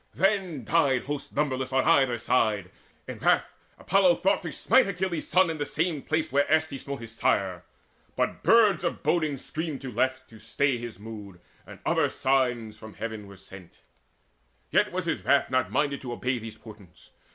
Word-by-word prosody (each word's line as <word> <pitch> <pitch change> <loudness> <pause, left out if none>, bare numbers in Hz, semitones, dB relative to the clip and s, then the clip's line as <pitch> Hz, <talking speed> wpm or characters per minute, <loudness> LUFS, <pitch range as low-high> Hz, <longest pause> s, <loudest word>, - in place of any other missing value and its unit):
Then 190 - 0
died 140 -5 +2
Hosts 145 +1 -5
numberless 130 -3 -1
on 130 0 +2
either 135 -7 +3
side. 110 -5 0 0.4
In - - -7
wrath - - +2 0.2
Apollo 190 -3 +3
thought 195 +1 +1
to 170 -4 -5
smite 260 +9 +3
Achilles' 180 -4 -3
son 185 -2 +3
In 160 - -6
the - - 0
same 160 -3 -1
place 160 +2 -1
where 140 +1 +2
erst 160 0 +2
he 135 - -5
smote 140 -1 -6
his 115 -1 -9
sire; 95 -5 0 0.5
But - - -1
birds 210 -7 +4
of 170 - -3
boding 155 -5 +1
screamed 155 +1 -5
to 135 -2 -6
left, 130 +3 -1
to 110 - -13
stay 140 +3 0
His 120 -4 -7
mood, 105 -3 -10 0.3
and - - -11
other - - +2
signs 125 -5 0
from 110 -1 -11
heaven 110 -3 -6
were 100 0 -13
sent; 95 -2 -14 0.9
Yet - - +3
was - - -3
his - - -2
wrath - - +2
not 130 0 +1
minded 140 -1 0
to 125 -2 -5
obey 125 +1 -2
Those 110 -1 -9
portents. 105 -6 -15
135 Hz, 185 wpm, -27 LUFS, 110-160 Hz, 0.9 s, birds